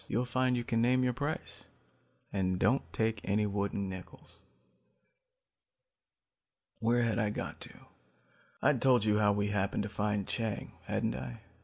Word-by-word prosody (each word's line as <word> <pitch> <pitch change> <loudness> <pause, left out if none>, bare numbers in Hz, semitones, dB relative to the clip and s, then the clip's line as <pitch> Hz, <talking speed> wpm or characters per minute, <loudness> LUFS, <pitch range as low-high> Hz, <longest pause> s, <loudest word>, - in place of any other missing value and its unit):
You'll 120 +4 0
find 125 0 +1
you 120 - -1
can 115 -1 0
name 130 +2 +4
your 125 -1 +2
price 145 +5 -4 0.7
and 95 -2 +1
don't 130 +8 +3
take 110 -1 0
any 105 +2 +1
wooden 100 -1 -1
nickels. 95 -1 -10 2.4
"Where 120 +2 +3
had 115 -1 +1
I 105 -2 +2
got 105 - -5
to? - - -8 0.9
I'd - - +3
told 125 -5 +4
you 105 0 +3
how 105 -1 +5
we 100 0 0
happened 100 0 0
to 105 - -4
find 105 -1 -1
Chang, 110 -3 -2 0.2
hadn't - - 0
I? 65 -1 -6
105 Hz, 150 wpm, -32 LUFS, 100-120 Hz, 2.4 s, how